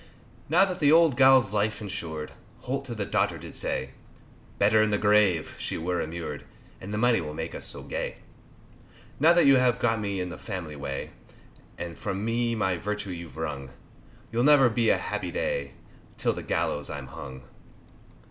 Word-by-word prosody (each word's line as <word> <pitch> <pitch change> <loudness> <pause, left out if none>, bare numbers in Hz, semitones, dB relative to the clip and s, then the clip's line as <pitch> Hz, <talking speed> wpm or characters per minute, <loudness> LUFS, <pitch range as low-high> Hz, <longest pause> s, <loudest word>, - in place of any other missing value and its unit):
Now 180 +5 +5
that 185 -2 -4
the 145 -1 +4
old 165 -4 +6
gal's 130 -5 +6
life's 105 0 0
insured, 80 -7 -5 0.3
Holt 135 +2 -3
to 120 -3 -6
the 105 -2 -2
daughter - - 0
did - - -10
say, 65 +1 -2 0.7
Better 110 +2 +4
in 110 - +3
the 105 - +1
grave 105 -6 +3
she - - -3
were 90 +2 -1
immured, 80 -3 -5 0.4
And 100 - -7
the 105 - -2
money 120 -1 +3
will 75 -1 -6
make - - -4
us - - -5
so - - -5
gay. - - -4 1.0
Now 160 +4 +6
that 175 - +4
you 135 -1 +7
have 125 -1 +3
got 115 -2 +1
me 100 -2 -2
in 90 0 -3
the 90 - -8
family 90 -8 -6
way, 70 -1 -5 0.7
And 85 -1 -6
from 95 +2 -3
me 115 0 0
my 95 -5 0
virtue 105 +2 -4
you've 85 -2 -8
wrung, 70 -4 -4 0.6
You'll 120 +1 +1
never 135 -4 +6
be 115 0 +1
happy - - 0
a - - -9
day, 70 -1 -2 0.5
Till - - +1
on - - -5
the - - -3
gallows 75 -1 -1
I'm 70 -3 -5
hung. 65 0 -9
105 Hz, 185 wpm, -27 LUFS, 80-120 Hz, 1.0 s, you